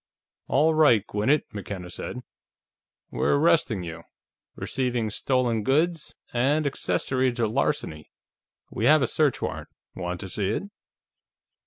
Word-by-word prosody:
"All 155 +4 +3
right, 145 -10 +4
Gwinnett," 110 +10 +1
McKenna 95 -3 -6
said. 125 - -6 0.9
"We're - - +1
arresting 145 - +2
you: 85 -1 -7 0.5
receiving 125 -4 -2
stolen 120 -1 0
goods, 155 +7 0 0.2
and 140 +6 +2
accessory 130 -2 0
to 120 -2 0
larceny. 110 - -1 0.6
We 110 - -2
have 150 +1 +6
a - - +2
search 150 +2 +1
warrant. - - -4 0.3
Want 90 -1 -4
to 95 - -6
see 95 +1 -1
it?" 110 - -1
125 Hz, 125 wpm, -25 LUFS, 105-145 Hz, 0.9 s, have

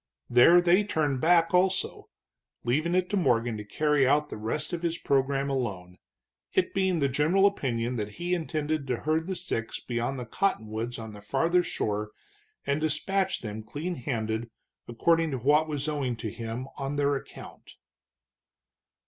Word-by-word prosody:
There 165 +9 +7
they 180 +3 +4
turned 150 -9 0
back, 165 +1 +4
also, 185 +1 +1 0.5
leaving 155 +9 +1
it 185 0 +2
to 205 - +1
Morgan 120 - +2
to 105 - -6
carry 145 +5 +2
out 150 +2 +2
the - - -6
rest 115 +11 -3
of 170 - -2
his 170 -1 -1
program 135 -2 +1
alone, 100 -10 -3 0.5
it - - +1
being 190 -2 +1
the 140 -3 +2
general 155 +9 +3
opinion 125 -10 0
that 105 -1 -4
he 175 +6 -2
intended 155 -3 -2
to 125 - 0
herd 160 +2 0
the 190 - -2
six 115 -10 -4
beyond 120 +2 -2
the 125 - -5
cottonwoods 115 - -2
on 110 -2 -7
the 105 - -11
farther 165 +12 +2
shore 105 -10 -2 0.6
and 140 +2 0
despatch 185 +6 0
them 110 -1 -5
clean 145 +11 -4
handed, 115 -5 -3 0.4
according 165 +7 +2
to 135 - -2
what 150 +6 +3
was 145 -1 -3
owing 140 -5 -1
to 110 -1 -5
him 115 +3 -5
on 135 +1 -3
their 145 0 +2
account. 135 - -10
140 Hz, 165 wpm, -28 LUFS, 115-165 Hz, 0.6 s, There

